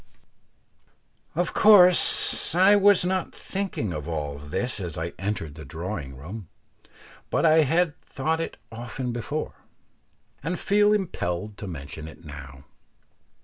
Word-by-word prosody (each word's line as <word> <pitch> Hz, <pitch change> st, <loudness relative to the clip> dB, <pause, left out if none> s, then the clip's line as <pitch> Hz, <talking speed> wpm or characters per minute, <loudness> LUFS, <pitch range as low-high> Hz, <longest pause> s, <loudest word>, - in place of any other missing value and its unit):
Of 175 Hz, +1 st, -1 dB
course 180 Hz, -5 st, +5 dB
I 190 Hz, +3 st, +6 dB
was 205 Hz, -2 st, +5 dB
not 185 Hz, 0 st, -1 dB
thinking 190 Hz, -, -3 dB
of 75 Hz, 0 st, -5 dB
all 75 Hz, -3 st, -4 dB
this 100 Hz, -, -3 dB
as 85 Hz, -4 st, -5 dB
I 85 Hz, +1 st, -4 dB
entered 95 Hz, -7 st, -3 dB
the 80 Hz, +1 st, -10 dB
drawing 80 Hz, -2 st, -6 dB
room, 90 Hz, +7 st, -9 dB, 0.8 s
but -, -, +1 dB
I 160 Hz, 0 st, +6 dB
had 160 Hz, +2 st, +1 dB
thought 160 Hz, +4 st, -2 dB
it -, -, -5 dB
often 120 Hz, +2 st, -5 dB
before, 120 Hz, +6 st, -4 dB, 0.8 s
and 165 Hz, +5 st, -2 dB
feel 205 Hz, +1 st, +3 dB
impelled 105 Hz, -, -2 dB
to 100 Hz, -, -6 dB
mention 75 Hz, -1 st, -7 dB
it 80 Hz, +1 st, -13 dB
now. 70 Hz, -2 st, -10 dB
110 Hz, 130 wpm, -25 LUFS, -, 0.8 s, I